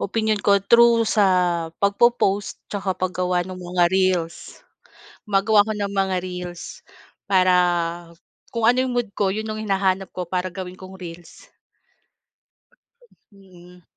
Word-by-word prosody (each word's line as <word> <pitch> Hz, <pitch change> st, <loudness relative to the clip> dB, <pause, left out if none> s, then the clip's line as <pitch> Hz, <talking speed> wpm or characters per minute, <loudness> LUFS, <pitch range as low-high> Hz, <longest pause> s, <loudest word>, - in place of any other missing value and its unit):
opinyon 215 Hz, 0 st, -1 dB
ko 200 Hz, -1 st, +4 dB
through 235 Hz, +1 st, +5 dB
sa 210 Hz, -2 st, +3 dB, 0.6 s
pagpo-post 200 Hz, -1 st, +2 dB
tsaka 195 Hz, -2 st, -3 dB
paggawa 180 Hz, -1 st, -1 dB
ng 185 Hz, 0 st, -8 dB
mga 180 Hz, 0 st, 0 dB
reels. 185 Hz, -3 st, -1 dB, 0.6 s
Gumagawa 205 Hz, +1 st, +3 dB
ako 220 Hz, -, -2 dB
ng 200 Hz, -1 st, -3 dB
mga 195 Hz, -1 st, 0 dB
reels 180 Hz, -1 st, -7 dB, 0.7 s
para 185 Hz, -2 st, +4 dB, 1.0 s
kung 230 Hz, -2 st, -3 dB
ano 245 Hz, +2 st, +4 dB
yung 255 Hz, -1 st, -2 dB
mood 240 Hz, -4 st, -1 dB
ko 200 Hz, -1 st, 0 dB
yun 215 Hz, +3 st, -3 dB
yung 215 Hz, 0 st, -4 dB
hinahanap 195 Hz, -2 st, 0 dB
ko 180 Hz, -, -3 dB
para 180 Hz, +1 st, -2 dB
gawin 180 Hz, 0 st, -7 dB
kong 190 Hz, 0 st, -11 dB
reels, 175 Hz, -, -11 dB, 1.9 s
mm. 180 Hz, -2 st, -18 dB
195 Hz, 130 wpm, -22 LUFS, 180-210 Hz, 1.9 s, through